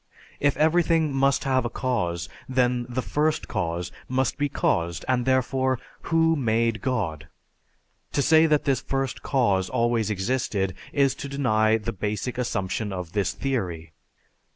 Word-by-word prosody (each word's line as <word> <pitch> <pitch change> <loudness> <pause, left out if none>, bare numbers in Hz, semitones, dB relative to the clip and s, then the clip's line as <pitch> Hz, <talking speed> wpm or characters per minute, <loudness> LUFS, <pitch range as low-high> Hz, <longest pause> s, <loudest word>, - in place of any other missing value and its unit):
If 145 -1 +2
everything 160 -1 +3
must 135 0 +2
have 130 -2 +2
a 120 - -2
cause, 90 -11 -2 0.2
then 125 -1 +1
the 125 +1 -2
First 155 +1 0
Cause 85 +1 -2 0.2
must 130 0 +1
be 145 0 +1
caused 85 -8 0
and 125 -1 +1
therefore: 130 0 +2 0.3
Who 165 0 +3
made 115 -4 +1
God? 85 - -2 0.9
To 140 - +2
say 160 +2 +5
that 150 -2 +2
this 135 -2 +1
First 135 -2 -2
Cause 100 -9 +1
always 115 -3 +1
existed 100 -2 -1 0.2
is 140 -2 +3
to 140 +1 -7
deny 110 -5 +2
the 105 - -4
basic 105 +5 -3
assumption 105 -3 -2
of 90 -3 -5
this 100 -1 0
"Theory." 90 -12 -3
125 Hz, 145 wpm, -25 LUFS, 100-135 Hz, 0.9 s, say